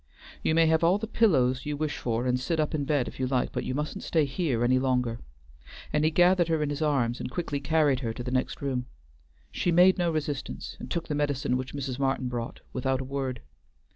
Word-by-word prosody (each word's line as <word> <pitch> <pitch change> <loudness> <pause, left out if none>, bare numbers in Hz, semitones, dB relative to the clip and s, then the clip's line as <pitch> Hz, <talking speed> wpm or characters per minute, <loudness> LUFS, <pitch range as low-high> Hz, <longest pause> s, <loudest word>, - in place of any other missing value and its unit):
"You 160 - +1
may 165 0 +5
have 160 +1 +3
all 175 +4 +4
the 215 - -4
pillows 135 - +2
you 150 -1 -2
wish 155 0 -2
for, 120 0 -2
and 125 0 +1
sit 160 +5 -1
up 155 - 0
in 145 -2 -1
bed 140 -3 +1
if - - -9
you 130 - 0
like, 130 -1 0
but - - -3
you 130 - -2
mustn't 150 +1 -3
stay 160 -3 +2
here 135 -4 -1
any 130 +1 +3
longer," 125 -3 0 0.7
and 150 0 +2
he 155 - +4
gathered 175 +1 +4
her 160 -2 +1
in 145 - -1
his 145 +1 -4
arms 130 -6 +1
and - - -4
quickly 145 0 -3
carried 145 -2 +2
her 115 -4 -2
to 120 - -6
the 125 - -4
next 130 +2 -1
room. 130 -3 -2 0.6
She 175 - 0
made 180 +2 +5
no 175 -1 +2
resistance, 145 - -4
and - - -8
took 170 -1 -2
the 150 - -2
medicine 145 -3 0
which 130 +2 -4
Mrs. 135 -2 -4
Martin 135 -2 0
brought, 120 -1 -5
without 130 0 0
a - - -3
word. 135 - -3
140 Hz, 230 wpm, -28 LUFS, 130-160 Hz, 0.7 s, may